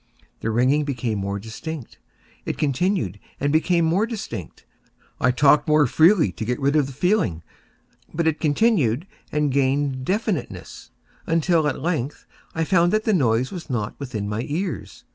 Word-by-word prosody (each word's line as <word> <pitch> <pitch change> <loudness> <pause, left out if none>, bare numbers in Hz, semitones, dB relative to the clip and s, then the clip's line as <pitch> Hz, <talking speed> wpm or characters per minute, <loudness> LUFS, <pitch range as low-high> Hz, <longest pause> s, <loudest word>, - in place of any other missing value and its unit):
The 115 - -2
ringing 130 +6 +2
became 120 -7 -2
more 100 +1 -2
distinct:—it 120 - -8
continued 145 - 0 0.2
and 145 +1 0
became 170 +1 +3
more 185 +7 +2
distinct: 195 - -7 0.5
I 130 - +3
talked 140 +4 +4
more 150 -1 +5
freely 160 - +4
to - - -6
get 125 +2 -2
rid 140 +1 +1
of 145 -3 +3
the - - -8
feeling: 145 - 0 0.7
but 170 +1 -1
it 160 -1 +1
continued 155 - +2 0.3
and 150 -1 +1
gained 135 0 +1
definiteness—until, 165 - -2
at 140 -1 -3
length, 150 -5 -2 0.3
I 160 - +1
found 175 0 +3
that 215 0 +2
the 220 - +1
noise 125 - +2
was 175 -5 -7
not 110 -5 -2
within 115 -7 -4
my 105 +2 -2
ears. 155 - -4
145 Hz, 150 wpm, -23 LUFS, 125-170 Hz, 0.7 s, more